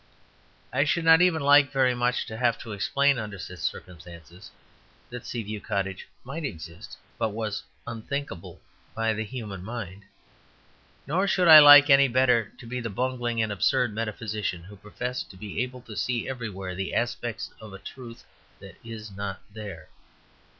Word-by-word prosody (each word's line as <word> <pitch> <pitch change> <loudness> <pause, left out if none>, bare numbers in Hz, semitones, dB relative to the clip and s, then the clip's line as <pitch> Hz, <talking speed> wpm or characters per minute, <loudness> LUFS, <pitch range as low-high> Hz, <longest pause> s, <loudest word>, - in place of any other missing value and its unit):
I - - +3
should 165 +3 0
not 160 +1 +7
even 170 -5 +3
like 145 -1 +6
very 130 -2 +3
much 125 +1 0
to 110 - -7
have 120 0 +1
to 115 - -8
explain, 140 +6 +1
under 105 -3 -6
such 95 0 -9
circumstances, 85 +1 -7 0.6
that 125 -1 -8
Sea 120 -2 -4
View 105 0 -6
Cottage 95 -2 -3 0.2
might 140 +6 -6
exist, 85 - -8 0.2
but 110 - +1
was 105 -1 -4 0.2
unthinkable 115 - -6 0.4
by 115 0 +1
the 110 +1 -3
human 105 -5 -7
mind. 100 -3 -7 1.0
Nor 180 +8 0
should 185 -2 +2
I 155 -1 +12
like 145 0 +9
any 140 0 +7
better 125 -3 +2
to - - -12
be 125 +2 -4
the 115 - -4
bungling 120 +1 -1
and 110 - -2
absurd 105 +3 +1
metaphysician 105 -5 -3
who 100 +3 -12
professed 120 +5 -5
to 95 - -13
be 105 +3 -4
able 125 0 -5
to 115 -3 -11
see 120 +2 -1
everywhere 105 -8 -5
the 95 0 -4
aspects 120 -2 -2
of 110 -2 -10
a 95 - -9
truth 115 +4 -11 0.4
that - - -13
is 110 -2 -8
not 100 0 -5
there. 100 -7 -8
115 Hz, 165 wpm, -26 LUFS, 100-130 Hz, 1.0 s, I